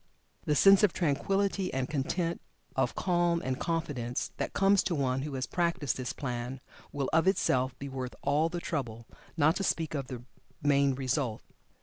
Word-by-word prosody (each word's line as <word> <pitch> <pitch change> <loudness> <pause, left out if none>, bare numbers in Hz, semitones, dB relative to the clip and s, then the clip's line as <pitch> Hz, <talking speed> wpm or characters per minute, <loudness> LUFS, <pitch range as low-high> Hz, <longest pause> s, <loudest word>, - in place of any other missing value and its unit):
The 150 - +2
sense 195 +5 +7
of 210 -5 +4
tranquillity 190 +5 0
and 130 -1 -1
content 165 +4 -1 0.3
of 130 -2 0
calm 175 -2 +2
and 130 +1 -2
confidence 145 -8 -2
that - - -2
comes 195 0 +4
to 170 - 0
one 135 -2 0
who 145 -1 -4
has 130 0 -1
practiced 170 -5 0
this 130 -1 -3
plan, 125 -1 -4 0.3
will 140 -3 -2
of 165 +3 +4
itself 130 -9 +2
be 140 - -6
worth 130 -2 -5
all 155 +3 +2
the 175 - -4
trouble, 115 -9 -4 0.3
not 155 +1 +4
to 195 - -2
speak 165 -4 0
of 140 -4 -3
the 125 -3 -7 0.4
main 140 -2 +3
result. 130 -3 -1
145 Hz, 175 wpm, -30 LUFS, 130-170 Hz, 0.4 s, sense